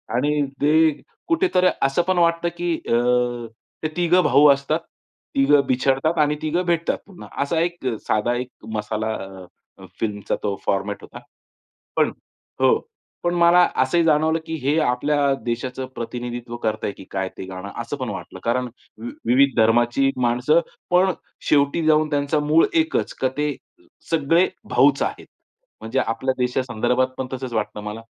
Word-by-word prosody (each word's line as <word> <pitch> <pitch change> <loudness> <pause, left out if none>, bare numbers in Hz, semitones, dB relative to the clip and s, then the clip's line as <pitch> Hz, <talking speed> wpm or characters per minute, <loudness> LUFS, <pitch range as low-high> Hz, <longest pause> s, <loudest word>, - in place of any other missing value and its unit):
आणि 145 +3 +1 0.2
ते 155 0 +3 0.3
कुठेतरी 330 - +3
असं 135 +5 +2
पण 185 0 0
वाटतं 170 0 +2
की 175 -1 -1
अ, 120 0 +1 0.4
ते 155 - +1
3घं 175 +1 +3
भाऊ 150 +1 +6
असतात. 140 +4 -1 0.6
3घं 140 +1 +5
बिछडतात 135 +5 +1
आणि 150 0 +3
3घं 165 +4 0
भेटतात 170 -1 0
पुन्हा, 195 -3 -12 0.2
असा 160 +3 -1
एक 170 -4 -3 0.2
साधा 110 +3 +1
एक 125 +1 -3 0.3
मसाला 110 +1 -2
अ, 95 -2 -8 0.3
अ, - - -12
फिल्मचा 105 -2 -2
तो 100 -1 -1
फॉर्मॅट 100 +1 -1
होता. - - -11 0.8
पण - - +2 0.5
हो. - - +5 0.5
पण 175 - +1
मला 170 +1 +5 0.2
असंही 165 +6 +2
जाणवलं 160 0 +3
की 160 - -6
हे 145 +3 +2
आपल्या 145 +1 +1
देशाचं 125 +2 -3
प्रतिनिधित्व 120 0 -5
करत 110 0 -1
आहे 100 - -2
की - - -12
काय 95 -1 -2
ते - - -6
गाणं, 95 +1 -7
असं 120 +5 -5
पण 130 -4 -4
वाटलं, 95 -1 -7
कारण 125 +2 0 0.3
विव 120 - -5 0.2
विविध 135 +3 +4
धर्माची 120 +4 +3
माणसं 125 +7 +3 0.3
पण 185 +2 +4 0.4
शेवटी 145 +3 +3
जाऊन 155 0 +4
त्यांचा 145 +1 0
मूळ 150 +2 +4
एकच 320 0 0
का 130 - +3
ते 150 -1 0 0.5
सगळे 165 +3 +3 0.2
भाऊच - - +4
आहेत. - - -4 0.6
म्हणजे 115 +4 -1
आपल्या 115 +3 -1
देशासंदर्भात 125 0 0
पण 130 - -3
तसंच 130 -1 -5
वाटतं 105 -1 -2
मला. 105 +2 -6
135 Hz, 155 wpm, -22 LUFS, 120-160 Hz, 0.8 s, भाऊ